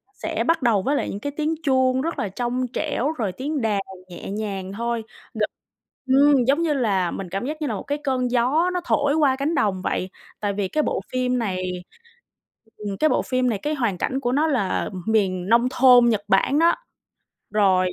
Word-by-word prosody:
sẽ - - -2
bắt 330 -2 +1
đầu 225 -6 +3
với 280 +8 0
lại - - -1
những 200 - -5
cái 285 +5 -4
tiếng 310 +1 0
chuông 260 -2 +2
rất 330 +3 -3
là 205 - -1
trong 245 +4 -2
trẻo 295 -2 -1
rồi 225 -12 -2
tiếng 285 +6 -3
đàn 210 -3 +1 0.3
nhẹ 175 +2 -8
nhàng 195 -3 -4
thôi, 235 +1 -2 0.3
gần 215 -1 -1 0.6
ừm, 270 -1 +5
giống 285 +4 +3
như 325 -3 +1
là 200 -10 +1
mình 190 -2 -6
cảm 195 +6 -3
giác 305 +3 -5
như 300 - -1
là 230 - -2
một 200 - -5
cái 290 +1 -2
cơn 255 -3 0
gió 270 +9 +2
nó 360 - -1
thổi 285 -1 +2
qua 285 -4 +3
cánh 285 +5 -1
đồng 205 -9 +1
vậy. 185 - -2 0.3
Tại 205 -1 -1
vì 195 -1 -1
cái 305 +8 0
bộ - - -1
phim 255 0 0
này 185 -5 -2 1.1
ừm, 205 -2 -5
cái 310 - +4
bộ - - +2
phim 255 -1 0
này 210 - -1
cái 300 - -1
hoàn 230 -9 -1
cảnh 265 +7 -1
của 245 -2 -1
nó 300 +4 +2
là, 225 -11 0
ừm, 185 -3 -6
miền 195 -4 +1
nông 235 +2 +4
thôn 250 -2 +6
Nhật 215 -3 +1
Bản 265 +9 +3
đó. 335 +1 +4 0.8
Rồi 190 -3 +3
245 Hz, 215 wpm, -23 LUFS, 200-285 Hz, 1.1 s, thôn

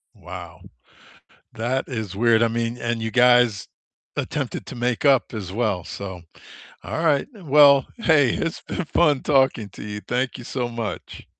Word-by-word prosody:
Wow. 90 -1 -10 0.9
That 120 +4 -2
is 110 -7 -5
weird, 115 +1 +3
I - - +4
mean, 115 +1 -2
and 120 -1 -2
you 115 0 -3
guys 120 -4 +4 0.5
attempted - - -3
to - - -8
make 120 +3 -1
up 135 -3 +4
as 95 -4 -5
well, 105 -5 -1
so 95 -3 -7 0.6
Alright, 160 -4 +1
well, 145 -6 +5
hey, 150 - +4
it's 165 - -3
been 180 - -4
fun 150 -4 +2
talking 130 -7 +2
to - - -11
you. 105 0 -6
Thank 125 +2 -2
you 120 - -9
so 125 -2 -3
much. 115 -3 -6
120 Hz, 155 wpm, -23 LUFS, 110-135 Hz, 0.9 s, well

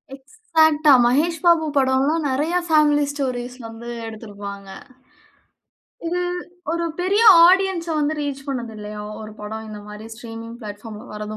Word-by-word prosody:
எக்ஸாக்ட்டா. 315 -1 +2
மகேஷ் 315 +7 +2
பாபு 335 -2 +5
படம்லாம் 275 +4 +2
நிறைய 295 +6 -1
families 295 -2 +3
stories 250 -3 -3
வந்து 225 +1 -10 0.2
எடுத்திருப்பாங்க. 200 -3 -9 1.4
இது 355 +2 -1 0.5
ஒரு 340 0 -1 0.2
பெரிய 395 +5 +2 0.2
ஆடியன்ஸ 375 -2 +3
வந்து 300 +1 0
ரீச் 275 -2 -4
பண்ணது 240 -4 -4
இல்லயா? 210 0 -7 0.2
ஒரு 215 0 -9
படம் 220 +1 -6
இந்தமாரி 210 +1 -9
ஸ்ட்ரீமிங் 230 0 -9
பிளாட்பார்ம்ல 210 +1 -9
வர்றது 210 0 -6
265 Hz, 120 wpm, -21 LUFS, 220-315 Hz, 1.4 s, பாபு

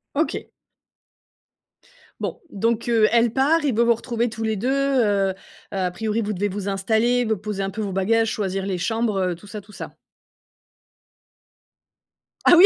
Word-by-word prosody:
OK. 315 +2 0 1.8
Bon, - - -3
donc 230 +2 0
heu, 225 -2 +4
elle 235 -1 +3
part 300 +4 +3
et 265 - +2
vous, 235 +2 +3
vous 235 - +5
retrouvez 235 +1 -1
tous 225 0 -5
les 220 0 0
2, 225 +6 -1
heu 245 -8 +2
heu, - - -6 0.4
à 185 -2 -1
priori, 220 +4 -1
vous 210 -1 -2
devez 205 +1 0
vous 200 0 -3
installer, 220 +5 +2
vous 220 -1 +1
poser 210 0 -4
un 195 - -1
peu 215 +3 -5
vos 200 - -2
bagages, 225 +4 +2
choisir 195 -3 -2
les 190 -2 -1
chambres, 220 +3 0
heu, - - -3
tout 190 +5 -15
ça, 210 +1 -6
tout 205 +1 -16
ça. - - -8 2.5
Ah - - +9
oui? 375 - +10
220 Hz, 175 wpm, -23 LUFS, 195-235 Hz, 2.5 s, oui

